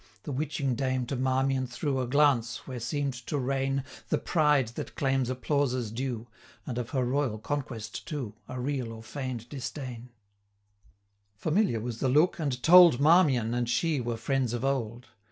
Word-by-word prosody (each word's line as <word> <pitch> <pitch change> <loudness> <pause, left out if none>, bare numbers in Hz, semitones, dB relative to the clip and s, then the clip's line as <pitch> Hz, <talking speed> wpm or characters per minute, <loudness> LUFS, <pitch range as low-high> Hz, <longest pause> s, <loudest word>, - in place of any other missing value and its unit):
The 145 - -5
witching 140 -1 -1
dame 130 0 -1
to 135 - -3
Marmion 130 0 +1
threw 135 +2 -2
A 125 - -2
glance, 130 -4 +2
where 130 -2 -6
seem'd 140 +3 -2
to 150 - -1
reign 135 0 0 0.3
The - - +2
pride 150 -7 +2
that 120 - -7
claims 135 -2 +1
applauses 130 -3 0
due, 120 -1 -3 0.4
And 125 -1 -3
of 120 - -4
her 130 -2 0
royal 130 -3 0
conquest 115 -3 -5
too, 135 -9 -4
370 - - -8
A - - -4
real 125 -3 -2
or 110 - -11
feign'd 125 -2 -5
disdain: 130 -3 -6 1.3
Familiar 155 - +1
was 115 0 -5
the 130 - +1
look, 150 +8 +3
and 135 -5 -2
told, 170 -6 +8
Marmion 145 -7 +4
and 120 -1 -1
she 150 +3 +1
were 120 -1 -3
friends 130 0 0
of 120 +2 -2
old. 125 -2 -2
130 Hz, 170 wpm, -28 LUFS, 120-145 Hz, 1.3 s, told